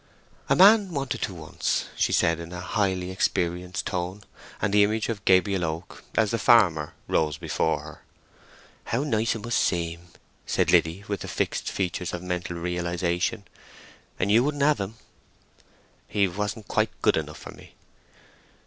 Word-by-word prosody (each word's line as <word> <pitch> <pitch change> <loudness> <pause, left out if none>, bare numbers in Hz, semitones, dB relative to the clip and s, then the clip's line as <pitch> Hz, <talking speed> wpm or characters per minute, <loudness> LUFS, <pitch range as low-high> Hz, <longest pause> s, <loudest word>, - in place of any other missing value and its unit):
"A - - +5
man 200 0 +7
wanted 130 -4 -2
to 95 - -2
once," 80 -2 -2
she - - +1
said, 85 0 +2
in 85 0 -8
a 90 - -5
highly 95 -1 -1
experienced 90 0 -1
tone, 90 +2 -3 0.4
and 100 - -1
the 105 0 +6
image 110 +2 0
of 110 -4 -4
Gabriel 95 0 +3
Oak, 80 +2 -5
as 110 -2 +2
the 115 - 0
farmer, 85 -11 +4
rose 75 -2 +1
before - - -1
her. - - -11 0.8
"How 120 +4 -1
nice 115 -5 0
it 110 - -7
must 120 0 0
seem!" 85 0 -1 0.4
said - - +1
Liddy, 85 +5 +3
with 100 -2 -2
the - - -7
fixed - - -2
features 90 -1 -2
of 90 - -7
mental 90 -1 -3
realization. 90 +4 -1 0.7
"And 95 +2 0
you 115 +3 +5
wouldn't 145 0 0
have 150 -3 +3
him?" 100 +3 -4 1.1
"He 100 -2 +2
wasn't 105 +3 -4
quite - - +1
good - - +4
enough - - -3
for - - -10
me." - - -16
95 Hz, 160 wpm, -26 LUFS, 90-110 Hz, 1.1 s, man